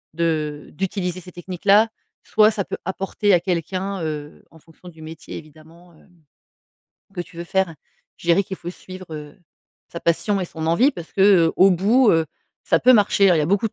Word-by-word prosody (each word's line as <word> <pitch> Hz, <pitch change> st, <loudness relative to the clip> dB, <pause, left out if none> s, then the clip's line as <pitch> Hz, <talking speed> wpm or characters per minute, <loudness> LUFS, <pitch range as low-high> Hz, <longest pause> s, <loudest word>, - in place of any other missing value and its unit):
de 155 Hz, -3 st, -2 dB
d'utiliser 185 Hz, 0 st, -3 dB
ces 180 Hz, -, -12 dB
techniques-là. 195 Hz, +5 st, +2 dB, 0.3 s
Soit 215 Hz, 0 st, +4 dB
ça 205 Hz, -3 st, -3 dB
peut -, -, -5 dB
apporter 195 Hz, +2 st, 0 dB
à -, -, +3 dB
quelqu'un, 185 Hz, +2 st, -3 dB
heu, 150 Hz, -2 st, -6 dB
en 160 Hz, -, -18 dB
fonction 165 Hz, +3 st, -16 dB
du 160 Hz, -2 st, -14 dB
métier, 160 Hz, 0 st, -9 dB
évidemment, 160 Hz, +3 st, -16 dB
hem, 160 Hz, -, -23 dB, 1.1 s
que 180 Hz, -, -4 dB
tu 175 Hz, -, -10 dB
veux 170 Hz, -, -6 dB
faire. 190 Hz, -1 st, -1 dB, 0.4 s
Je -, -, -14 dB
dirais 170 Hz, +4 st, +4 dB
qu'il 190 Hz, -, -7 dB
faut 175 Hz, 0 st, -7 dB
suivre, 185 Hz, +1 st, -11 dB
heu, 150 Hz, +1 st, -9 dB, 0.5 s
sa 170 Hz, -, -6 dB
passion 195 Hz, +4 st, 0 dB
et 180 Hz, -, -3 dB
son 160 Hz, -1 st, -6 dB
envie 200 Hz, -, +3 dB
parce 170 Hz, -, -10 dB
que, -, -, -3 dB, 0.3 s
heu, -, -, -3 dB
au 190 Hz, +2 st, +6 dB
bout, 210 Hz, +7 st, +3 dB
heu, 165 Hz, -1 st, +3 dB, 0.4 s
ça 165 Hz, -, +2 dB
peut 255 Hz, +1 st, +6 dB
marcher, 200 Hz, -2 st, +4 dB
hein. 180 Hz, -, +5 dB
Il -, -, +1 dB
y -, -, +1 dB
a -, -, -1 dB
beaucoup 200 Hz, +5 st, +1 dB
de -, -, -35 dB
175 Hz, 205 wpm, -21 LUFS, 165-195 Hz, 1.1 s, au